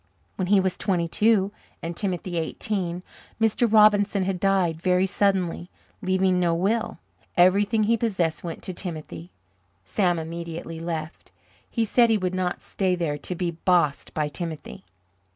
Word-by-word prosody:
When 185 - -2
he 200 +1 +5
was 190 -1 0
twenty 175 -4 0
two 205 +1 +2 0.3
and 170 +1 -4
Timothy 180 -3 -2
eighteen, 180 +1 -2 0.4
Mr. 225 +1 +2
Robinson 205 -2 +5
had 185 -1 -2
died 185 -4 +1
very 185 0 +3
suddenly, 190 -3 0 0.3
leaving 185 0 +2
no 170 -2 +2
will. 210 +6 0 0.4
Everything 205 +5 +4
he 230 +2 +2
possessed 190 -8 -1
went 170 -2 -6
to 185 - -4
Timothy. 155 - -6 0.6
Sam 175 - +1
immediately 165 0 -6
left. 165 -1 -5 0.4
He 230 -2 0
said 235 +2 +4
he 220 - +4
would 185 -2 -2
not 185 -1 -2
stay 185 -2 0
there 155 -4 -2
to 180 - -4
be 175 -1 -1
"bossed" 170 -3 +1
by 150 -1 0
Timothy. 155 - -7
180 Hz, 150 wpm, -25 LUFS, 170-200 Hz, 0.6 s, he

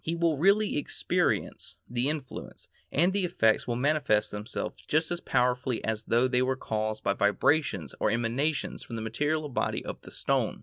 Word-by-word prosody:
He 165 - -1
will 170 -2 +2
really 200 +7 +3
experience 145 - -1
the 120 +3 0
influence, 150 -3 -6 0.2
and 175 +6 +3
the 200 -1 +1
effects 115 -11 +2
will 120 - 0
manifest 125 -6 +2
themselves 105 +3 -5
just 160 +2 +1
as 175 - -2
powerfully 125 0 +1
as 110 0 -2
though 120 +2 +3
they 125 -1 +2
were 130 +1 +1
caused 110 -3 -3
by 100 - +2
vibrations 105 - +1
or - - +2
emanations 120 +7 -1
from 115 - -7
the 110 - -4
material 150 +7 -1
body 135 - -2
of - - -6
the - - -12
stone. - - 0
130 Hz, 175 wpm, -28 LUFS, 110-155 Hz, 0.2 s, really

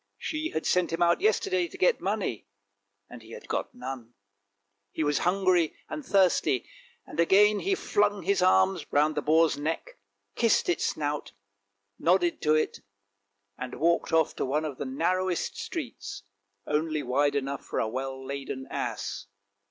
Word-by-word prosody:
She 315 +1 -3
had 160 - -3
sent 180 -2 +2
him 165 +1 +1
out 170 - +3
yesterday 380 -4 +2
to 380 - -12
get 465 +6 +3
money, 195 - -2 0.6
and 125 - -11
he 115 +1 -13
had - - -10
got - - -2
none. 125 -2 -7 0.8
He 160 - -2
was 145 -1 +1
hungry 180 -2 +2
and 305 -1 -5
thirsty, 190 - +2 0.4
and - - -9
again 205 +4 +5
he 390 0 +1
flung 205 - +1
his 195 +2 +1
arms 190 -1 +4
round 150 +2 +3
the 150 - -1
boar's 160 +1 +3
neck, 165 - -4 0.3
kissed 230 -6 +2
its 175 - +1
snout, 150 -1 -3 0.7
nodded 175 0 +2
to 155 0 +3
it, 155 - 0 0.8
and 125 0 -5
walked 170 +2 +1
off 160 -1 +2
to - - -1
one 150 +4 0
of 145 -4 -6
the - - -3
narrowest 185 -9 -1
streets, - - -6 0.4
only 155 0 -1
wide 140 +3 +1
enough 140 0 -2
for - - -5
a - - +1
well 130 +3 -5
laden 135 -1 -5
ass. - - -4
165 Hz, 160 wpm, -28 LUFS, 145-195 Hz, 0.8 s, again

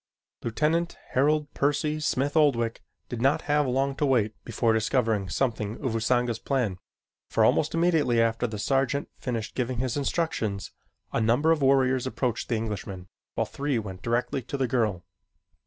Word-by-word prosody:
Lieutenant 155 +8 0
Harold 145 +2 +1
Percy 150 +2 0
Smith 145 -1 0
Oldwick 120 -7 +2 0.3
did 120 -2 -5
not 135 +4 +2
have 145 -1 +2
long 135 +2 0
to 150 - +1
wait 110 -5 +2
before 115 0 +1
discovering 110 -3 +1
something 110 -4 -1
of 130 -5 -2
Usanga's 120 +1 +1
plan, 120 -10 -1 0.5
for - - +3
almost 155 - +2
immediately 160 -8 +3
after 115 +1 +2
the 110 -2 -5
sergeant 135 +5 0
finished 115 -4 -3
giving 125 -1 -2
his 125 0 -1
instructions, 135 - -1 0.4
a - - +1
number 120 +9 +3
of 160 -2 +2
warriors 130 -1 +3
approached 125 -3 -2
the 120 - +1
Englishman, 100 -4 -5 0.3
while - - +1
three 140 -2 -2
went 95 -4 -5
directly 120 +5 -1
to 140 - -5
the 130 -2 +1
girl. 110 -8 0
125 Hz, 155 wpm, -27 LUFS, 115-140 Hz, 0.5 s, for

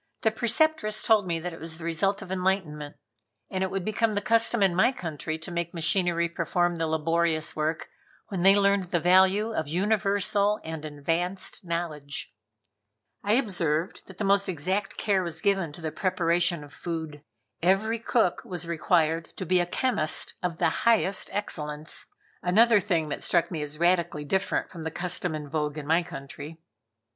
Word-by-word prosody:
The 220 - +4
Preceptress 235 0 +1
told 215 -4 +3
me 165 -1 -1
that 175 +1 -5
it 165 - -10
was 160 0 -3
the 165 - -8
result 195 +5 0
of 185 - -10
enlightenment, 180 -6 -1 0.6
and 190 0 -1
it 190 - -1
would 190 -1 -3
become 215 0 0
the - - +2
custom 230 +1 +2
in 190 -2 +3
my 185 +8 +4
country 160 - -5
to 160 +2 -8
make 170 0 -3
machinery 170 +1 +2
perform 170 +1 0
the 165 - 0
laborious 160 0 +1
work 155 +1 -2 0.4
when 190 -4 -3
they 195 +2 +7
learned 200 -1 +3
the 175 0 0
value 190 +5 +4
of 160 - -2
universal 200 +3 +1
and 160 -1 -6
advanced 165 +7 -2
knowledge. 165 -5 -4 0.9
I 205 - +2
observed 175 - 0
that 190 - -13
the 215 - -2
most 200 0 +3
exact 185 +5 -2
care 200 -3 +1
was 170 -3 -4
given 195 -5 +1
to 170 - -10
the 160 -1 -3
preparation 170 -2 +1
of 145 - -13
food. 160 -4 -5 0.4
Every 205 +6 +2
cook 225 -5 +1
was 175 -2 -4
required 165 -1 +1
to 190 - -4
be 185 +1 +3
a 175 - 0
chemist 180 -5 +1
of 180 -2 -2
the - - +3 0.2
highest 205 -4 +2
excellence; 150 -6 -3 0.3
another 215 +5 +5
thing 170 -6 0
that - - -4
struck 170 0 +1
me 160 -3 -3
as 150 0 -6
radically 170 -3 +1
different 190 +6 -1
from 170 - -8
the 160 - -3
custom 175 0 -2
in 150 -1 -6
vogue 150 0 -2
in 150 - -5
my 165 +3 +3
country. 150 -1 -9
175 Hz, 175 wpm, -27 LUFS, 160-195 Hz, 0.9 s, they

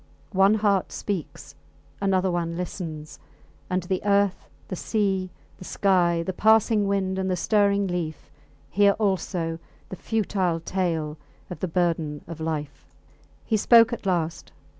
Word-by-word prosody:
One 195 +2 +5
heart 205 -3 +1
speaks 165 -6 -5 0.5
another 190 -1 +2
one 170 -1 -2
listens; 160 -4 -6 0.5
and 185 -1 0
the 185 +1 -2
earth, 200 -1 +1 0.2
the 185 - -4
sea, 195 -2 -1 0.3
the - - -9
sky, 175 -4 +2
the 190 - -2
passing 220 +1 +3
wind 190 -1 0
and 190 0 -1
the 185 - +1
stirring 200 +1 +2
leaf, 175 -4 -4 0.4
hear 200 +1 +4
also 180 -5 -1 0.3
the - - -6
futile 190 -5 -1
tale 165 -4 -2 0.3
of 180 - -6
the 185 - -2
burden 165 -4 -1
of 165 -1 -8
life. 155 -3 -4 0.6
He 220 - +1
spoke 230 +2 +6
at 220 - -5
last. 170 -3 -1
185 Hz, 140 wpm, -25 LUFS, 170-200 Hz, 0.6 s, spoke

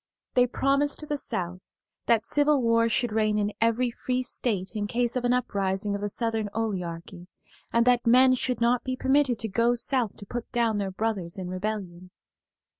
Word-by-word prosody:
They 250 -1 +4
promised 280 +4 0
the 295 - -1
South 180 -5 -3 0.5
that 230 -1 +3
civil 290 +1 +3
war 230 -1 +2
should 240 +1 0
reign 215 -1 +1
in 205 0 -1
every 230 +2 +2
free 255 +2 -2
state 210 -6 -2
in 205 -1 -2
case 240 +2 0
of 250 -1 -1
an 245 - +2
uprising 200 -4 -1
of 200 - -3
the 205 - -2
Southern 225 -1 -1
oligarchy, 180 -4 -4 0.4
and 235 0 +3
that 245 -1 +3
men 255 +2 +6
should 250 0 -1
not 240 +1 +2
be 255 -1 -2
permitted 265 -2 +2
to 225 - -3
go 230 +4 +2
South 240 -3 0
to 200 - -10
put 240 +3 -6
down 230 -3 +1
their 195 -1 -2
brothers 190 -3 -3
in 185 -1 -5
rebellion. 185 -2 -5
230 Hz, 185 wpm, -26 LUFS, 200-250 Hz, 0.5 s, men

